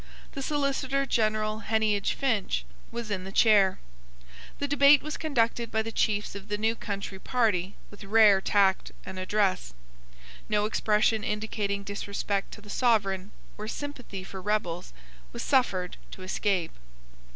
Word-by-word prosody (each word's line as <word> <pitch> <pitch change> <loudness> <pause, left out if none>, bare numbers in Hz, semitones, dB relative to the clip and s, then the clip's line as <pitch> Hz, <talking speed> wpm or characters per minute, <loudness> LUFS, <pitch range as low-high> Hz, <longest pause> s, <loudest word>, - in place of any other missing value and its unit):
The 275 - -6
Solicitor 275 -1 0
General 215 -3 0
Heneage 215 -2 +1
Finch, 210 - 0 0.3
was 235 -2 -5
in 185 -2 -2
the 190 - -7
chair. 200 -3 +5 0.8
The 285 - -2
debate 285 0 +6
was 305 0 -4
conducted 235 -6 0
by 220 0 +1
the 225 - -5
chiefs 210 -2 0
of 200 0 -9
the 210 -1 -2
new 220 +2 +1
country 200 -3 -5
party 205 -6 0 0.2
with 205 - -12
rare 205 -1 +5
tact 195 -1 +2
and 190 0 -6
address. 185 - 0 0.7
No 210 -1 +2
expression 215 0 +2
indicating 210 -1 -2
disrespect 200 0 -3
to 210 - -10
the 205 - -14
Sovereign 200 -6 +1 0.3
or 215 - -5
sympathy 250 -7 -6
for 190 0 -8
rebels 180 -4 -2 0.4
was - - -4
suffered 195 -10 +1 0.2
to 185 - -9
escape. 185 -2 0
210 Hz, 140 wpm, -28 LUFS, 195-230 Hz, 0.8 s, debate